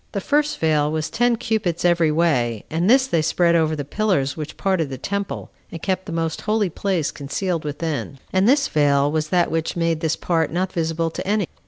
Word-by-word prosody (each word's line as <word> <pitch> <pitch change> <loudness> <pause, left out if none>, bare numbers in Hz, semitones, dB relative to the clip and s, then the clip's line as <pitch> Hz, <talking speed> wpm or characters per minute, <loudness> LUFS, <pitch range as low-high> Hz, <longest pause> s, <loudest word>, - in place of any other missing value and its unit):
The 200 - -1
first 295 +7 +1
veil 150 -2 +2
was 155 0 -2
ten 240 +1 +2
cubits 205 -7 -1
every 170 -3 +3
way, 130 -9 +1
and 170 +5 +1
this 260 +2 +6
they 170 -12 +1
spread 170 +2 +2
over 160 -2 +2
the 145 -2 -4
pillars 145 -5 0
which 155 -1 -7
parted 185 -6 0
the 135 - -5
temple, 200 +7 -4 0.2
and 165 - -6
kept 190 +3 -2
the - - -5
most 165 -1 -2
holy 210 -4 0
place 180 -4 -1
concealed 165 +4 -3
within; 150 -1 -4 0.2
and 190 +4 +3
this 275 +1 +4
veil 145 -1 +2
was 155 0 -1
that 175 0 +2
which 165 0 -1
made 165 -2 0
this 160 -1 0
part 165 -3 0
not 185 +3 -1
visible 165 -1 -1
to 190 - -6
any. 205 -1 +1
165 Hz, 205 wpm, -22 LUFS, 155-190 Hz, 0.2 s, this